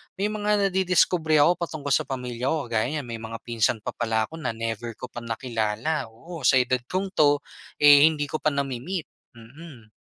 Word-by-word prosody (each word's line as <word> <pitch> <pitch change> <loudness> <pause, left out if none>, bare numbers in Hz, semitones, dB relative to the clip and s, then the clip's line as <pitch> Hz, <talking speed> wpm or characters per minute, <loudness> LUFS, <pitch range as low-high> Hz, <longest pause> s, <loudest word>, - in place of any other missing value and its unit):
may 205 +2 -1
mga 210 -2 +1
nadidiskubre 180 -3 +2
ako 175 +4 +3
patungkol 155 -4 -4
sa 135 - +2
pamilya 125 -2 -4
ko. 140 -5 -2
Kagaya 110 0 +1
niyan, 145 0 -3
may 115 - -5
mga 115 0 -6
pinsan 115 -1 0
pa - - -3
pala 110 -2 0
ako 160 +9 -8
na 115 -7 -3
never 115 0 -4
ko 125 - -9
pa - - -6
nakilala, 115 +4 -2
oo, 165 +10 -10
sa - - +5
edad 125 0 +2
kong 190 +1 -2
'to, 145 -5 +3 0.4
eh, 145 0 +9
hindi 155 -2 0
ko 155 - -2
pa - - -1
nami-meet. 140 +4 -3 0.2
Mm. 120 0 -14
140 Hz, 190 wpm, -25 LUFS, 115-160 Hz, 0.4 s, eh